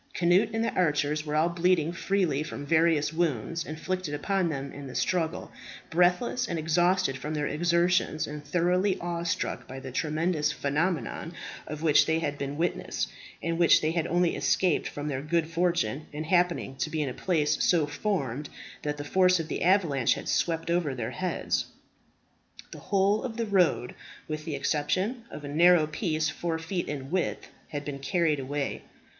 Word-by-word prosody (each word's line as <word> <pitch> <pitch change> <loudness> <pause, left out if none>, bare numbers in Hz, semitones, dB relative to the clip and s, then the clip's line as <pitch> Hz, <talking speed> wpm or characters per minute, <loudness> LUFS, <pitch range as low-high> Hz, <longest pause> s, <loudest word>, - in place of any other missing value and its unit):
Cnut 180 +5 +3
and 225 0 0
the - - -1
archers 150 -3 +1
were 150 - -1
all 160 +3 +3
bleeding 170 -1 +2
freely 180 -6 0
from 150 -2 -6
various 160 -1 +3
wounds 165 -1 -1
inflicted 155 0 -3
upon 185 +4 0
them 140 -2 -4
in 140 -1 -8
the 130 - -9
struggle, 170 -5 -1 0.4
breathless 180 +9 +2
and 170 - -2
exhausted 175 0 +2
from 150 +3 -4
their 150 -1 -1
exertions, 170 0 +1
and 150 0 -7
thoroughly 180 +5 +1
awe 170 -1 -3
struck 170 - -2
by 130 - -7
the 130 -1 -8
tremendous 155 +2 0
phenomenon 165 +3 -1 0.3
of 150 +1 -6
which 155 -3 +5
they 160 0 +2
had 145 -3 -2
been 140 +1 -3
witnesses, 175 +2 -1 0.3
and 165 0 -1
which 170 - +6
they 155 - 0
had 165 -1 -1
only 175 0 +2
escaped 180 -4 +1
from 145 +1 -5
their 135 -3 -2
good 160 +2 0
fortune 165 -6 0
in 150 +1 -4
happening 175 -4 +1
to 135 +3 -1
be 155 -1 -1
in 140 - -2
a - - -5
place 155 -1 +1
so 165 -4 +3
formed 150 - -2 0.3
that 150 0 -3
the 145 - -5
force 180 +3 +4
of 160 0 -4
the - - -3
avalanche 165 - +3
had - - -7
swept 165 0 0
over 170 -6 0
their 115 -3 -3
heads 185 -1 -1 1.1
The - - -9
whole 200 +1 +2
of 235 -3 -5
the 230 - 0
road, 180 - +2 0.3
with 155 0 -4
the 160 -4 -3
exception 175 - -1
of 150 - -9
a - - -5
narrow 165 +2 +5
piece 155 0 -1
four 165 +1 -2
feet 170 +2 -3
in 135 -1 -5
width, 185 -1 -1 0.2
had 145 -1 -5
been 140 -2 -5
carried 155 +2 +1
away. 140 +1 -3
160 Hz, 180 wpm, -28 LUFS, 150-180 Hz, 1.1 s, which